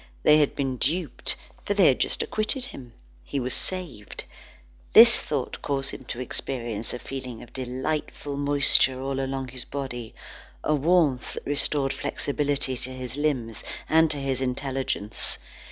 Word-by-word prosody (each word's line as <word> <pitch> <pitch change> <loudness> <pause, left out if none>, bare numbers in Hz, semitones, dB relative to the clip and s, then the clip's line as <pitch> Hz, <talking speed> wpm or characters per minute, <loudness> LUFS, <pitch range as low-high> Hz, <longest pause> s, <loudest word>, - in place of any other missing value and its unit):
They 150 - +7
had 145 - +2
been 135 -3 -2
duped, 160 +3 0 0.3
for 205 - -1
they 195 -3 +5
had 130 - +4
just - - 0
acquitted 220 +4 0
him. 125 - -11 0.3
He 140 - -3
was 125 0 0
saved. 170 - -2 0.7
This - - +9
thought - - -3
caused 140 -2 -2
him 130 - -9
to 120 - -5
experience 120 -3 -3
a - - -4
feeling 125 -3 -7
of 120 - -16
delightful 135 +3 -3
moisture 140 -2 +4
all 135 0 -2
along 135 -1 -3
his 125 0 -4
body, 125 -5 -6 0.5
a 155 - +2
warmth 150 -3 +2
that - - -7
restored 140 -1 +3
flexibility 140 -1 -1
to 125 - -3
his 130 -1 -6
limbs 130 -7 -1 0.2
and 160 0 +4
to 150 - 0
his 135 -2 -2
intelligence. 130 -4 -1
135 Hz, 155 wpm, -26 LUFS, 125-145 Hz, 0.7 s, This